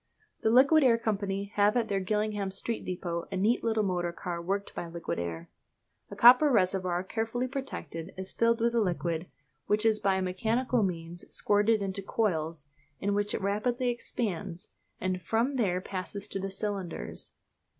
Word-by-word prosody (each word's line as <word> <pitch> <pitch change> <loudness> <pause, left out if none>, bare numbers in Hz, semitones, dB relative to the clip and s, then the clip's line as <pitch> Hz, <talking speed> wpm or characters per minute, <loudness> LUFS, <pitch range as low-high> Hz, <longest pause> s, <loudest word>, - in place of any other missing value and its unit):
The 220 - +2
Liquid 275 +6 +6
Air 240 -3 +5
Company 200 -3 -2
have 205 +3 +4
at 230 -2 +1
their 200 -2 0
Gillingham 210 0 -1
Street 200 +4 -2
depôt 175 -2 -3
a 190 - -2
neat 215 +6 +2
little 220 -2 +1
motor 175 -3 0
car 170 0 -5
worked 200 +3 -2
by 170 - -5
liquid 170 - -4
air. 85 -1 -5 0.6
A 200 - -8
copper 245 +8 +8
reservoir, 185 -4 +1
carefully 225 +5 -2
protected, 250 - -6
is 190 0 -6
filled 230 0 +2
with 235 +1 +3
the 235 -1 +2
liquid, 175 -3 -1 0.4
which 210 +1 +2
is 220 -1 +4
by 190 -1 +2
mechanical 225 +7 0
means 175 -3 -3
squirted 210 +1 +2
into 195 0 -3
coils, 165 -7 -1 0.3
in 200 +1 0
which 205 0 0
it - - -3
rapidly 235 +6 0
expands, 200 -6 -4 0.3
and 185 0 -1
from 230 - 0
them 185 -6 +1
passes 195 +2 -5
to 195 - -2
the 195 0 -3
cylinders. 195 - -4
200 Hz, 165 wpm, -29 LUFS, 180-225 Hz, 0.6 s, copper